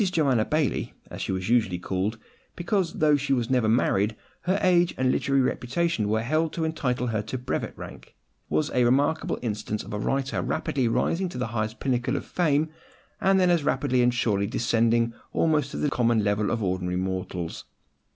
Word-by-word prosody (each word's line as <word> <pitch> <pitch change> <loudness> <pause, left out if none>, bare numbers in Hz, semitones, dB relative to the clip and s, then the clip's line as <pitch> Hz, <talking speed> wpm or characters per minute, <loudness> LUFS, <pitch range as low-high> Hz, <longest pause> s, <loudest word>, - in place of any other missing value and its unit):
JOANNA 145 - +2
BAILLIE, 155 -2 -1 0.2
as - - -6
she - - -2
was 95 -1 -2
usually 110 -6 +2
called, 95 +5 -2 0.4
because, 180 -1 0
though 150 -1 +3
she 145 -1 0
was 120 -2 0
never 125 -4 +3
married, 105 -2 +2 0.3
her 185 +2 +2
age 175 -1 +3
and 130 0 +2
literary 135 -1 +2
reputation 125 -3 0
were 110 +1 +1
held 155 +5 0
to 165 - -1
entitle 130 -6 -1
her 110 -3 -1
to 110 +5 -5
brevet 125 - -3
rank, - - -10 0.3
was 75 0 0
a 125 - +3
remarkable 140 +6 +2
instance 105 -2 -3
of 105 - -9
a 105 - -2
writer 135 +4 -1
rapidly 130 0 -1
rising 170 +10 0
to 170 - -8
the 125 - -1
highest 110 0 -2
pinnacle 125 -1 0
of - - -3
fame, 155 -3 +1 0.5
and 195 0 +4
then 180 -1 +4
as 170 -4 +2
rapidly 130 -2 +1
and 120 0 +3
surely 100 -4 +1
descending 115 +1 +1 0.2
almost 150 -4 +2
to 150 - -6
the - - 0
common 115 -4 +2
level 105 0 +1
of 115 -2 -1
ordinary 90 -1 -1
mortals. 95 -2 -4
125 Hz, 185 wpm, -26 LUFS, 110-150 Hz, 0.5 s, and